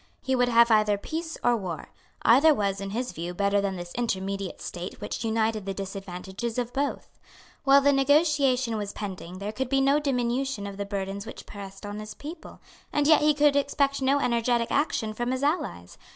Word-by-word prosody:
He 265 - 0
would 245 -1 +2
have 235 0 +5
either 215 -1 +4
peace 320 +8 -5
or 245 0 +4
war. 185 -7 -5 0.3
Either 285 +7 +6
was, 200 -3 -1
in 195 - -4
his 245 +5 -3
view, 175 0 -5
better 200 +1 +2
than 195 -1 -1
this 175 -1 -7
intermediate 195 -4 -2
state 175 +1 -6
which - - -4
united 220 -2 0
the 195 - -2
disadvantages 195 +3 -5
of 245 -1 -2
both. 280 +2 -3 0.5
While 275 0 +7
the 285 +1 +4
negotiation 275 -4 +3
was 205 -1 -4
pending 185 -3 -6
there 200 +2 -4
could 255 +3 -3
be 270 0 +2
no 275 +2 +4
diminution 255 -4 -1
of 200 -1 -7
the 200 - -3
burdens 200 +1 -4
which - - -9
pressed 195 0 -9
on 205 +1 -5
his 215 0 -8
people; 315 +3 -10 0.3
and 295 - +1
yet 310 +1 +6
he 300 0 +4
could 290 -1 +4
expect 280 0 +1
no 275 +2 +3
energetic 235 -2 +1
action 240 -7 0
from 240 +3 -2
his 260 +1 -1
allies. 90 - -2
230 Hz, 195 wpm, -27 LUFS, 200-275 Hz, 0.5 s, While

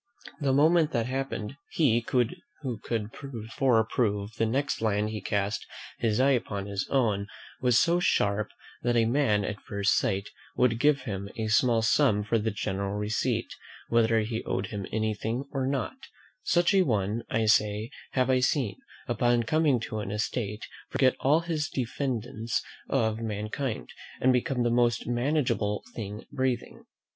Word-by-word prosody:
The 140 -3 +1
moment 155 +3 +4
that 115 -3 +1
happened, 135 -2 -3
he, 120 -7 +2 0.6
who 125 -7 -4
could 110 -2 -3 0.2
before 115 0 +1
prove 105 -2 -1
the 115 - 0
next 135 +4 -1
land 105 -1 +1
he 110 - -4
cast 100 0 -1 0.3
his 110 -1 +1
eye 135 +2 +5
upon 100 -6 -1
his 100 -1 -3
own; 120 -7 +3
and 100 - -6 0.3
was 125 -2 +4
so 175 -1 +3
sharp, 105 -10 +1 0.3
that 120 0 +1
a 115 -1 +4
man 115 -5 +2
at 105 - -4
first 100 0 +1
sight 100 0 0 0.3
would 115 -2 +2
give 145 0 +4
him 100 -4 -5
a 110 -1 -2
small 120 -2 +3
sum 110 -3 +3
for 105 - -7
a 115 - +5
general 100 -1 -2
receipt, 105 +1 -1 0.4
whether 115 -1 +3
he 110 +1 -3
owed 95 - -1
him 100 -3 -5
anything 110 +3 -1
or 135 -2 -1
not: 140 - -2 0.4
such 175 +3 +3
a 195 - +5
one, 110 - 0
I 115 -1 +1
say, 105 +1 +2 0.2
have 130 0 +2
I 130 - +4
seen, 130 +1 +1 0.3
upon 120 0 +2
coming 145 +1 +2
to 110 -1 -4
an 105 - -4
estate, 105 0 -2 0.2
forget 130 -2 +3
all 150 +5 +3
his 160 -3 -2
diffidence 120 -3 -2 0.3
of 110 0 +1
mankind, 110 +3 -3 0.3
and 130 0 +4
become 125 0 +1
the 120 - +2
most 120 0 +2
manageable 120 -4 0
thing 105 -1 -6
breathing. 130 -3 -2
115 Hz, 160 wpm, -28 LUFS, 105-130 Hz, 0.6 s, eye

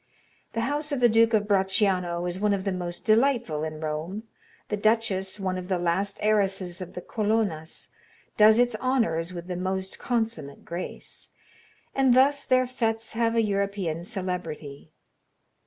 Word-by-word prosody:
The 230 - -1
house 295 +5 -2
of 280 - 0
the 245 - +6
Duke 230 0 +4
of 210 -1 +1
Bracciano 190 -3 +1
is 180 +1 -3
one 205 0 +2
of 190 - -4
the 195 - -1
most 175 -1 -4
delightful 225 - +2
in 155 -1 -4
Rome, 160 +7 -3 0.5
the 210 - 0
duchess, 205 -2 +1
one 185 -1 -1
of 180 - -7
the 185 -1 +1
last 175 +3 0
heiresses 195 -4 +1
of 180 - -8
the 180 - -6
Colonnas, 210 -7 -1 0.5
does 215 +1 +7
its 245 0 +3
honors 185 -11 +1
with 175 -1 -7
the 180 0 -4
most 190 +1 -3
consummate 220 - -2
grace, 170 +2 -6 0.6
and 265 -2 +4
thus 280 +2 +4
their 255 0 +3
fêtes 225 -3 -2
have 230 0 +1
a 230 - +3
European 200 -5 -1
celebrity. 180 -8 -5
200 Hz, 155 wpm, -26 LUFS, 180-225 Hz, 0.6 s, does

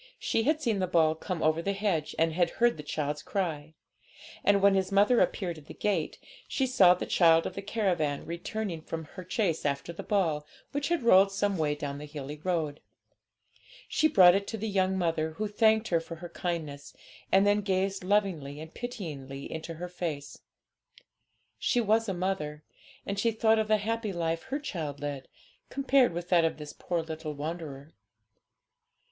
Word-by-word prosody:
She 225 - 0
had 310 +2 +2
seen 230 -9 0
the 185 - 0
ball 160 -3 +3
come 165 +1 -4
over 155 +1 +2
the 200 +3 -1
hedge, 195 -7 -1
and 165 0 +2
had 175 0 +2
heard 240 0 +4
the 150 - -7
child's 150 0 -3
cry; 160 -5 -3 0.7
and, 200 0 +4
when 200 0 +5
his 190 0 0
mother 205 +5 +4
appeared 175 -5 0
at 150 - -19
the - - -10
gate, 210 -1 -1 0.3
she 265 - 0
saw 195 -9 +6
the - - -4
child 165 -2 +4
of - - -3
the 195 - -5
caravan 180 -9 -1
returning 170 +1 -4
from 160 0 -6
her 180 +4 -10
chase 180 -2 -1
after 140 +3 -2
the - - -7
ball, 165 -8 0 0.3
which 285 0 -1
had 340 -6 0
rolled 195 -3 +6
some 200 0 0
way 150 -3 0
down 145 -1 -5
the 150 - -8
hilly 145 0 -7
road. 160 -5 -1 1.1
She 310 - +3
brought 185 - +7
it 200 +1 0
to 225 - -4
the 220 +1 -3
young 190 -2 +1
mother, 160 -3 0
who 215 +6 -2
thanked 220 +1 +3
her 170 - +3
for 165 +1 -8
her 175 +2 -9
kindness, 160 -5 -5 0.4
and 195 +1 +5
then 205 +1 +3
gazed 195 -1 -1
lovingly 180 -8 0
and 160 +1 -9
pityingly 150 - -6
into 160 +1 -5
her 175 +3 -5
face. 165 -5 -5 1.2
She 245 - +1
was 225 0 +2
a - - 0
mother, 155 -5 -3 0.4
and 200 0 -3
she 230 - +3
thought 220 0 +3
of 215 - 0
the 215 0 +4
happy 220 0 -2
life 165 -2 -1
her 265 +2 -2
child 160 - -5
led, 145 -2 -5 0.4
compared 270 -3 +3
with 175 +1 -5
that 175 -2 +5
of 165 - 0
this 150 -1 -8
poor 175 -2 -2
little 160 -1 -5
wanderer. 150 -1 -6
175 Hz, 185 wpm, -29 LUFS, 155-205 Hz, 1.2 s, brought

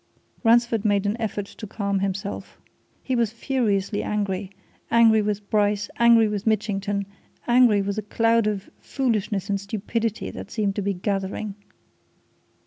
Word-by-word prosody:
Ransford 230 -2 +3
made 205 -1 +2
an 205 +1 +1
effort 210 -2 -2
to 215 - -10
calm 200 -1 -1
himself. 195 +1 -4 0.5
He 260 - -1
was 230 -3 +1
furiously 220 -5 -1
angry 200 -2 -2 0.4
angry 225 -2 +5
with 205 -1 -2
Bryce, 205 -1 +1
angry 235 -1 +6
with 210 0 -3
Mitchington, 205 -2 0 0.4
angry 240 -4 +5
with 200 +1 -3
the - - 0
cloud 230 +1 +2
of 205 -2 -2
foolishness 215 -7 -1
and 200 -1 -1
stupidity 220 +2 -3
that - - -8
seemed 205 -3 -1
to - - 0
be 200 0 -1
gathering. 195 +2 -3
210 Hz, 140 wpm, -24 LUFS, 200-225 Hz, 0.5 s, angry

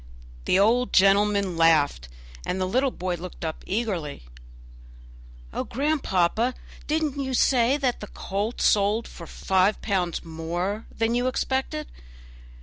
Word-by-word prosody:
The 185 - +3
old 235 +5 +3
gentleman 200 -1 +3
laughed, 150 - +3 0.3
and 185 - -2
the 185 - +1
little 255 +8 +1
boy 180 -6 -3
looked 175 0 -8
up 160 - -5
eagerly. 185 - -3 1.3
"Oh, - - -2
grandpapa, 245 - 0 0.3
did 315 +1 +1
you 300 - 0 0.2
not 260 - -1
say 250 +1 +3
the 260 -4 +1 0.2
colt 205 +4 -3
sold 210 +2 +2
for 170 - -11
five 190 +5 +1
pounds 180 -5 -1
more 175 +6 -3
than 225 +1 -1
you 245 +1 +1
expected? 265 +4 -1
200 Hz, 130 wpm, -25 LUFS, 180-245 Hz, 1.3 s, The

